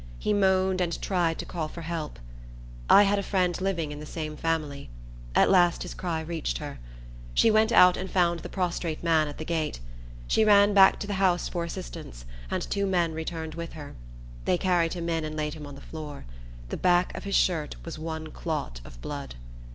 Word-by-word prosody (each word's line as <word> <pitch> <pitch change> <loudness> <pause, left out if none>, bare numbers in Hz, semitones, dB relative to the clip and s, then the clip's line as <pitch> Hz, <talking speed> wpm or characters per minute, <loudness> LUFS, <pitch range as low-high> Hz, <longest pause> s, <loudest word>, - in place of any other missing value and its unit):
He 210 - 0
moaned, 190 -2 +2
and 170 -2 -1
tried 175 -4 0
to - - -5
call 165 -3 -3
for 170 +2 -9
help. 160 -2 -4 0.7
I 205 - +9
had 200 0 +2
a - - 0
friend 185 -3 0
living 170 -6 -1
in 150 - -7
the 150 - -7
same 155 -1 -5
family. 150 - -2 0.5
At - - +6
last 175 -2 +4
his 180 - -6
cry 170 -3 -3
reached 160 - -3
her. - - -7 0.6
She 225 - +5
went 220 +1 +4
out 180 -5 +7
and 190 - -4
found 170 -2 +2
the - - -8
prostrate 175 -4 -2
man 160 -2 +3
at 145 - -7
the 155 - -6
gate. 160 - -2 0.5
She 220 - +3
ran 205 -1 +6
back 195 -1 +7
to - - -2
the 205 - -3
house 180 -2 +2
for 170 -2 -3
assistance, - - -8 0.2
and - - -1
two 200 0 -1
men 175 -4 +1
returned 160 0 -5
with 170 +1 -6
her. 150 -3 -9 0.5
They - - +2
carried 175 -3 +1
him 170 -2 -4
in, 165 -1 0
and 155 0 -4
laid 150 -1 -2
him 150 -2 -8
on 140 - -9
the 140 - -12
floor. 150 - -8 0.4
The - - -3
back 180 0 +2
of - - -6
his 200 - -1
shirt 160 -5 +1
was 165 -2 -6
one 160 -1 -5
clot 105 - -4
of - - -13
blood. - - -6
170 Hz, 205 wpm, -27 LUFS, 155-185 Hz, 0.7 s, I